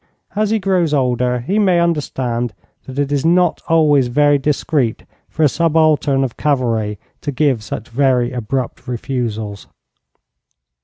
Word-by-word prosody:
As 210 0 +1
he 220 - +2
grows 180 -6 +1
older 125 -2 0
he 190 - 0
may 185 -4 +3
understand 130 -8 -1 0.3
that 130 0 -8
it 145 0 0
is 140 -2 0
not 175 +1 +2
always 150 -5 +4
very 145 +3 +3
discreet 140 -4 -1 0.2
for 160 - -1
a - - +7
subaltern 155 -3 +2
of 125 -4 -4
cavalry 115 -7 0 0.2
to 145 - -3
give 135 -4 +1
such 110 +2 -6
very 125 -1 +1
abrupt 125 +1 -4
refusals.' 115 -5 -4
135 Hz, 140 wpm, -18 LUFS, 120-155 Hz, 0.3 s, a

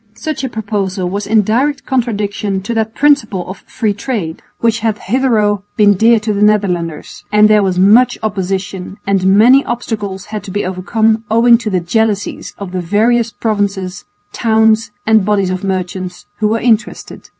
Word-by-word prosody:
Such 310 -3 -4
a 265 - -2
proposal 200 -4 -3
was 200 +1 -3
in 215 0 +3
direct 270 +7 0
contradiction 205 -5 -2
to 235 - -3
that 220 0 -2
principle 255 -11 +1
of 190 - -8
free 215 -3 -1
trade 200 -7 -4 0.2
which 230 0 +1
had 220 -1 -1
hitherto 215 -4 +1 0.2
been 205 -1 +5
dear 225 +4 +4
to 215 -1 -1
the 200 - -2
Netherlanders, 180 -7 0
and 210 0 +5
there 215 -1 +4
was 190 -2 0
much 210 +7 +4
opposition, 190 -2 -3
and 195 -1 +1
many 255 +6 +6
obstacles 210 -5 -4
had 210 - -3
to - - -8
be 205 +2 -2
overcome 220 +4 0
owing 230 +2 +5
to 230 - -3
the 185 -3 0
jealousies 205 +3 -2
of 200 -3 -7
the 185 -1 -3
various 225 +6 +1
provinces, 200 -4 -3 0.3
towns 220 -1 +2 0.2
and 220 -2 +4
bodies 200 -2 0
of 185 +1 -4
merchants 185 -1 -4
who 215 - +2
were 225 +2 0
interested. 225 -1 -2
210 Hz, 170 wpm, -14 LUFS, 190-225 Hz, 0.3 s, many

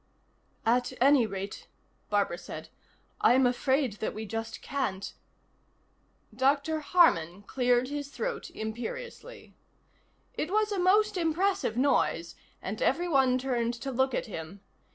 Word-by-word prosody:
"At 245 +2 +2
any 265 -2 +5
rate," 195 0 -6 0.4
Barbara 200 -4 +1
said, - - -8 0.5
"I'm 260 +2 +5
afraid 255 -2 +1
that - - -3
we 220 +1 -5
just 225 +1 -5
can't 260 -9 -3 0.6
" - - -30
Dr. 280 +4 +2
Harman 205 - +3
cleared 245 +2 +1
his 290 -1 -4
throat 480 - -4
imperiously. 480 - -7 0.8
It 310 - -3
was 430 +2 +1
a 400 - -1
most 415 +3 +3
impressive 350 - 0
noise, 210 -11 +1 0.3
and 205 +3 -4
everyone 270 -5 +3
turned 245 -2 -1
to 270 +3 -5
look 265 0 +1
at - - -1
him. 180 -1 -8
260 Hz, 125 wpm, -29 LUFS, 220-320 Hz, 0.8 s, any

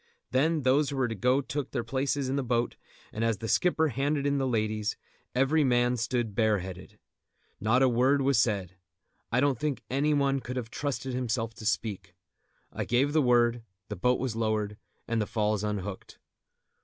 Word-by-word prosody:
Then 150 +4 +2
those 135 +3 +3
who 140 - -4
were 130 -2 +2
to 115 - -3
go 125 +6 +2
took 145 -1 -4
their - - -2
places 135 +3 -1
in 130 - -1
the 140 - +1
boat, 120 -1 0 0.4
and 110 - -2
as 115 -2 +1
the 115 - -5
skipper 160 +2 +2
handed 140 +2 -1
in 140 0 +1
the 135 - 0
ladies, 110 -3 -1 0.4
every 140 +4 +3
man 120 -1 +3
stood 120 -2 -1
bareheaded. 95 -4 -1 0.6
Not 120 +5 +3
a - - +6
word 130 +3 +3
was 135 -2 +3
said. 100 -6 0 0.6
I 120 - +2
don't 140 -3 +2
think 140 -5 -2
any 145 +3 +2
one 140 -1 +2
could 125 +1 -6
have 115 -2 -4
trusted 135 -2 -3
himself 115 -2 -2
to 110 -2 -6
speak. 110 -5 -2 0.6
I - - -2
gave 135 +5 +1
the 155 - +4
word, 120 -2 +3 0.3
the 105 - -3
boat 125 +7 +1
was 125 -3 -2
lowered, 110 -2 -1 0.3
and 115 -1 0
the 105 - -1
falls 105 -2 0
unhooked. 100 -2 -4
125 Hz, 185 wpm, -28 LUFS, 110-135 Hz, 0.6 s, a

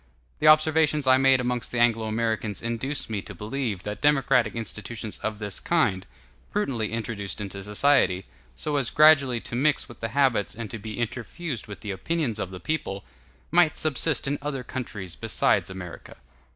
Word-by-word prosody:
The - - +3
observations 155 -1 +5
I 130 0 +6
made 135 -1 +5
amongst 125 -1 -2
the 125 - -2
Anglo 115 -2 +3
Americans 110 -1 -1
induce 115 +5 -2
me 105 -3 -3
to - - -10
believe 110 -3 -3
that 105 0 -5
democratic 135 -6 +3
institutions 110 -1 -5
of 110 -1 -3
this 105 -2 -4
kind, 100 - +1 0.4
prudently 130 - -1
introduced 110 -3 -4
into 100 -1 -5
society, 105 -3 +3 0.3
so 145 - -2
as 135 -4 +1
gradually 145 -5 +5
to - - -6
mix 145 +3 +2
with 120 - -13
the 115 - -2
habits 130 -7 +1
and 110 -2 -6
to 115 - -5
be 110 +1 -7
interfused 120 - -4
with 100 - -9
the 105 - -4
opinions 120 - -2
of 95 - -3
the 95 -1 -8
people, 120 -10 -3 0.5
might 170 -2 +4
subsist 155 -1 0
in 145 +1 -1
other 140 -3 -3
countries 105 -8 -6
besides - - +1
America. 90 -2 -9
120 Hz, 170 wpm, -26 LUFS, 105-140 Hz, 0.5 s, I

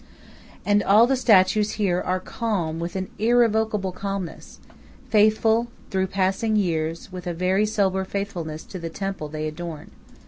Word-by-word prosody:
And 205 0 +3
all 210 +4 +6
the 265 +2 +2
statues 215 -3 +4
here 185 -4 0
are 185 +1 -1
calm 185 -7 -2
with 170 +2 -4
an 190 -1 -2
irrevocable 220 -3 +2
calmness, 195 -1 -6 0.5
faithful 220 +2 +3 0.2
through 190 0 +1
passing 195 +4 0
years 165 -3 -1
with 180 -1 -7
a 175 - -2
very 190 +4 +1
sober 195 -3 +1
faithfulness 180 -6 -4
to 185 - -8
the 165 -1 -5
temple 195 -3 -4
they 155 0 -4
adorn. 155 0 -7
190 Hz, 145 wpm, -24 LUFS, 175-215 Hz, 0.5 s, all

